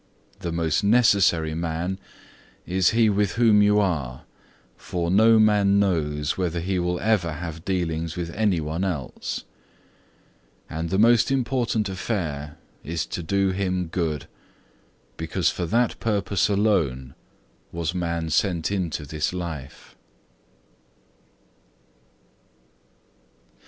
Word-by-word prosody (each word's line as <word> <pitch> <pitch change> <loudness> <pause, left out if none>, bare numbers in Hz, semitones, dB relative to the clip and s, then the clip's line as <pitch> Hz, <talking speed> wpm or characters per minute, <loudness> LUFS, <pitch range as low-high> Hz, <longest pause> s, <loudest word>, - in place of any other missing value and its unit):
The 85 - -4
most 85 +2 0
necessary 100 -8 +3
man 85 +3 -3 0.7
is 95 0 +2
he 115 0 +3
with 105 -1 +1
whom 115 -3 +4
you 105 0 +4
are, 75 -11 -1 0.5
for 85 -1 -3
no 110 +3 +6
man 105 -2 +4
knows 75 -6 0
whether 85 -2 -1
he 90 +2 -1
will 90 0 -1
ever 95 -7 +1
have 80 0 -7
dealings 85 -4 -2
with 85 -1 -4
any 100 -4 +1
one 80 +4 -3
else: 85 -9 -4 1.2
and 80 +1 -4
the 95 - 0
most 115 +3 +5
important 125 -5 0
affair 85 -7 -4 0.3
is, 80 +1 -3
to - - -5
do 95 +3 +1
him 95 -2 -1
good, 80 -4 -2 0.9
because - - 0
for 85 - -3
that 120 +5 +1
purpose 100 -2 0
alone 80 -12 +1 0.6
was 85 0 -2
man 85 -2 -2
sent 85 +1 +1
into 85 -6 -2
this 75 +1 -2
life!" 80 -7 -7
90 Hz, 115 wpm, -24 LUFS, 80-100 Hz, 1.2 s, no